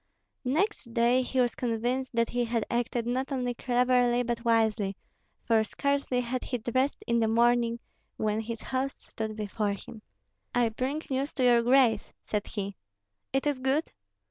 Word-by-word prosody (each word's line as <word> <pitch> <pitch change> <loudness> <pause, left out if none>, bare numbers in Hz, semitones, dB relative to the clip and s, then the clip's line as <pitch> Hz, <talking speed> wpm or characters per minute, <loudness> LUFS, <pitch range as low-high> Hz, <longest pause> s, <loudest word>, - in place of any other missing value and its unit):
Next 305 - -1
day 240 +2 +4
he 255 +1 -1
was 245 -2 +3
convinced 245 +2 -2
that 230 0 +2
he 245 0 0
had 230 -2 -1
acted 235 0 0
not 255 +3 -1
only 250 -2 -1
cleverly 245 0 +2
but 235 -1 -2
wisely, 220 -4 +2 0.5
for 225 -1 +4
scarcely 280 +2 0
had 250 +1 -3
he 250 - -2
dressed 255 +5 -1
in 235 0 +2
the 225 - +2
morning, 235 +1 +3 0.4
when 215 0 0
his 225 0 -5
host 265 +1 -2
stood 220 -1 -5
before 210 -1 -1
him. 215 +2 -10 0.5
"I 240 -2 +3
bring 265 +7 -2
news 270 +3 -1
to 260 - -1
your 240 -1 +6
grace," 240 -3 +3
said 210 -1 -2
he. 200 -2 -4 0.5
"It 270 +1 0
is 290 -3 +1
good?" 265 +5 0
240 Hz, 165 wpm, -29 LUFS, 225-255 Hz, 0.5 s, your